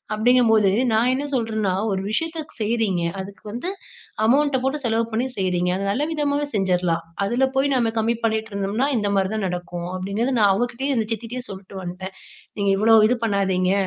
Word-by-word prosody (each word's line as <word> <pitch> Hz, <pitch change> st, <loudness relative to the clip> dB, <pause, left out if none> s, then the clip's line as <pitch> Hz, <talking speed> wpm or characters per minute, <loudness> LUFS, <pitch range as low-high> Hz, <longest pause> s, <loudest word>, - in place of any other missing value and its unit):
அப்டிங்கும் 240 Hz, +1 st, +4 dB
போது 210 Hz, -3 st, +4 dB, 0.2 s
நான் 235 Hz, +3 st, +3 dB
என்ன 275 Hz, +3 st, -2 dB
சொல்றேன்னா, 220 Hz, -6 st, 0 dB, 0.2 s
ஒரு 190 Hz, -1 st, -1 dB
விஷயத்த 325 Hz, +6 st, -2 dB, 0.2 s
செய்றீங்க, 215 Hz, -5 st, 0 dB, 0.2 s
அதுக்கு 195 Hz, +1 st, -11 dB
வந்து 245 Hz, -, -4 dB, 0.5 s
அமௌண்ட்ட 275 Hz, +3 st, +3 dB
போட்டு 270 Hz, +2 st, -1 dB
செலவு 230 Hz, 0 st, +1 dB
பண்ணி 240 Hz, +4 st, 0 dB
செய்றீங்க. 180 Hz, -2 st, 0 dB
அத 195 Hz, -, -3 dB
நல்ல 275 Hz, +9 st, 0 dB
விதமாவே 290 Hz, -1 st, 0 dB
செஞ்சுரலாம். 180 Hz, -4 st, +1 dB, 0.2 s
அதுல 245 Hz, +6 st, +2 dB
போய் 275 Hz, +1 st, +2 dB
நம்ம 235 Hz, -3 st, +2 dB
கம்மி 230 Hz, +2 st, +1 dB
பண்ணிட்டு 220 Hz, 0 st, -1 dB
இருந்தோம்னா, 200 Hz, +6 st, 0 dB
இந்த 205 Hz, -2 st, 0 dB
மாரி 190 Hz, +1 st, +1 dB
தான் 215 Hz, -2 st, -1 dB
நடக்கும் 175 Hz, -1 st, -5 dB
அப்டிங்குறத 200 Hz, +8 st, -1 dB
நான் 205 Hz, -2 st, +5 dB
அவங்ககிட்டேயும், 245 Hz, +5 st, -1 dB
அந்த 220 Hz, -2 st, 0 dB
சித்திகிட்டேயும் 240 Hz, +3 st, -6 dB
சொல்லிட்டு 190 Hz, 0 st, -9 dB
வந்துட்டேன். 185 Hz, +2 st, -7 dB, 0.4 s
நீங்க 200 Hz, -1 st, +2 dB
இவ்வளோ 225 Hz, +2 st, +5 dB
இது 250 Hz, -, +2 dB
பண்ணாதீங்க, 190 Hz, -3 st, +1 dB
220 Hz, 175 wpm, -22 LUFS, 195-250 Hz, 0.5 s, நான்